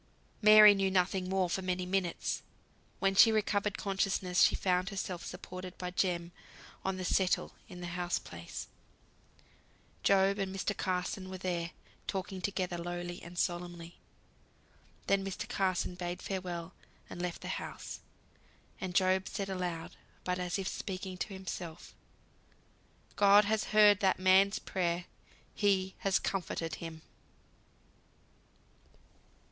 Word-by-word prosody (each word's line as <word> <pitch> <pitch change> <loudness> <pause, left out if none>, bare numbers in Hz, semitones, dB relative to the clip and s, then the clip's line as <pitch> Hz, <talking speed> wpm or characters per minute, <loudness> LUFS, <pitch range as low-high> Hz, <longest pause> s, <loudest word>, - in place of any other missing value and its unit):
Mary 215 -1 +10
knew 195 -1 +1
nothing 185 0 +1
more 190 -1 +2
for 185 +2 -2
many 185 0 -1
minutes. 185 -2 -1 0.6
When 195 0 +2
she 225 +3 +8
recovered 210 -1 +1
consciousness, 190 -2 0
she - - +6
found 185 0 +1
herself 190 -3 -4
supported 185 0 -8
by 180 -1 -4
Jem 175 -2 0 0.5
on 190 -1 -1
the 185 - -4
"settle" 185 0 +1 0.2
in 180 - -9
the - - -4
house 180 0 0
place. 85 -1 -8 1.3
Job 195 +1 +3
and 195 -1 -1
Mr. 195 +1 -1
Carson 185 +1 -2
were 190 - -5
there, 175 -2 -2 0.4
talking 190 -1 -3
together 180 -2 -2
lowly 175 +1 -5
and 175 +1 -11
solemnly. 175 -1 -3 1.1
Then 195 0 +2
Mr. 195 -1 -4
Carson 185 -2 0
bade 175 0 -4
farewell 180 -3 -4 0.3
and 175 - -7
left 180 -1 -3
the - - -6
house; - - -7 0.8
and 185 -2 -4
Job 190 0 +3
said 195 -2 -4
aloud, 180 -3 -4 0.3
but 180 0 -1
as 180 +1 -1
if 195 -1 -3
speaking 190 -1 -4
to - - -1
himself, 175 -3 -7 1.2
"God 205 0 +6
has 215 +1 +1
heard 210 -1 +6
that 190 -2 +3
man's 190 +1 +5
prayer. 175 -2 -1 0.5
He 190 -2 +1
has 195 -1 +2
comforted 170 -3 -2
him." 160 -1 -7
185 Hz, 130 wpm, -32 LUFS, 175-195 Hz, 1.3 s, Mary